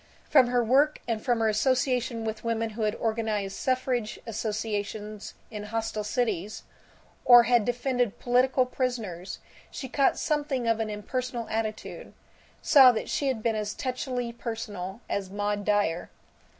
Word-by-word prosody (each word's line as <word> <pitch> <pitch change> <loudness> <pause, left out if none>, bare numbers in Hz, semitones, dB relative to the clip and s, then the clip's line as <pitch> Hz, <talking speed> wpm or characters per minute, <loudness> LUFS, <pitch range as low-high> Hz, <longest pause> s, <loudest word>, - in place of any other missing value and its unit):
From 265 -4 +6
her 245 0 +2
work 280 +6 +3
and 225 -2 -2
from 240 -3 +1
her 225 - +3
association 245 0 +1
with 220 0 -4
women 230 -1 -1
who 220 +1 -6
had 215 0 +1
organized 220 -3 -2
suffrage 255 -4 -1
associations 215 -1 -4 0.2
in 210 -1 -6
hostile 220 0 -3
cities, 210 -3 -2 0.6
or 240 -1 +9
had 240 -3 +3
defended 245 -2 0
political 255 +1 +2
prisoners, 225 -9 -3 0.3
she 265 - -6
caught 270 +2 +2
something 290 -5 -1
of 225 -1 +2
an 220 -1 -1
impersonal 240 +3 -4
attitude; 220 -1 -4 0.5
saw 265 -3 +8
that 225 - -4
she 280 - 0
had 245 -5 -1
been 230 -2 +1
as 210 0 -3
touchily 250 -2 -3
personal 215 -4 -5
as 195 -2 -2
Maud 205 +1 -2
Dyer. 205 -5 +1
225 Hz, 145 wpm, -27 LUFS, 210-250 Hz, 0.6 s, or